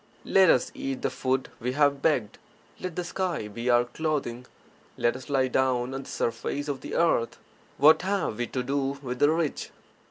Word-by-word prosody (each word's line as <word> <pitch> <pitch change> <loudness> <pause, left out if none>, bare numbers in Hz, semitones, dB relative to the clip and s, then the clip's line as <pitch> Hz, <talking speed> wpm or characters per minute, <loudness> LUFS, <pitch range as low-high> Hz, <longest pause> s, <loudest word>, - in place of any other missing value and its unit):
Let 190 -2 +5
us 125 - +3
eat 135 -1 -4
the - - 0
food 130 0 -1
we 125 +2 -2
have 140 -1 +2
begged; 130 -10 0 0.4
let 185 -3 -5
the 180 - -2
sky 175 - -2
be 115 +4 -4
our 120 0 +4
clothing; 125 -3 -3 0.5
let 120 - +1
us 130 +3 -9
lie 135 -2 +2
down 130 -1 +1
on 135 - -4
the - - -12
surface 120 +5 -2
of 140 -3 -3
the - - -6
earth; 160 -9 +2 0.4
what 155 +2 +6
have 190 - -1
we 120 - -1
to 125 - -3
do 140 +1 -1
with 125 -1 -4
the 145 - +5
rich? 160 -2 -1
135 Hz, 190 wpm, -27 LUFS, 125-155 Hz, 0.5 s, what